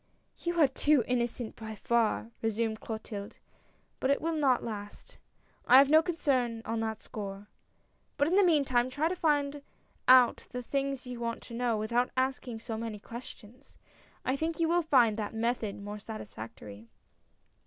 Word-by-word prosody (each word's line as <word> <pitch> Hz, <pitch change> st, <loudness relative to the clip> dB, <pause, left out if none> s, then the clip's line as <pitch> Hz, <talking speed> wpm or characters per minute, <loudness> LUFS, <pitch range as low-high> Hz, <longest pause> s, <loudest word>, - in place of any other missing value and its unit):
"You 345 Hz, 0 st, -2 dB
are 300 Hz, -, +7 dB
too 275 Hz, 0 st, +3 dB
innocent, 240 Hz, -1 st, -1 dB
by 220 Hz, -1 st, -7 dB
far!" 230 Hz, 0 st, 0 dB
resumed 225 Hz, 0 st, -1 dB
Clotilde, 220 Hz, -2 st, -6 dB, 0.3 s
" -, -, -39 dB
but 260 Hz, -, 0 dB
it 280 Hz, -, +3 dB
will 330 Hz, +1 st, -1 dB
not 280 Hz, -5 st, +2 dB
last. 205 Hz, -2 st, -7 dB, 0.5 s
I 255 Hz, -, +8 dB
have 275 Hz, +1 st, +6 dB
no 315 Hz, +1 st, +8 dB
concern 260 Hz, -9 st, 0 dB
on 225 Hz, 0 st, -2 dB
that 220 Hz, -1 st, -3 dB
score. 200 Hz, -1 st, -6 dB, 0.7 s
But 285 Hz, 0 st, +3 dB
in 350 Hz, -, +2 dB
the 405 Hz, -, +6 dB
meantime 270 Hz, -8 st, +3 dB
try 290 Hz, +5 st, 0 dB
to 370 Hz, -, -2 dB
find 290 Hz, -4 st, +1 dB, 0.5 s
out 255 Hz, -2 st, +6 dB
the 250 Hz, 0 st, -5 dB
things 275 Hz, 0 st, -2 dB
you 250 Hz, -1 st, -6 dB
want 230 Hz, -1 st, -3 dB
to 235 Hz, -, -11 dB
know 235 Hz, -1 st, 0 dB
without 235 Hz, +4 st, +1 dB
asking 255 Hz, -3 st, -1 dB
so 225 Hz, -2 st, -5 dB
many 225 Hz, -2 st, -4 dB
questions. 235 Hz, +2 st, -11 dB, 0.5 s
I 260 Hz, -, +1 dB
think 320 Hz, +3 st, -2 dB
you 330 Hz, -, +3 dB
will 345 Hz, +1 st, +3 dB
find 245 Hz, -9 st, +4 dB
that 215 Hz, 0 st, -4 dB
method 225 Hz, -2 st, -1 dB
more 205 Hz, +1 st, -7 dB
satisfactory. 110 Hz, -, -9 dB
240 Hz, 165 wpm, -30 LUFS, 220-280 Hz, 0.7 s, I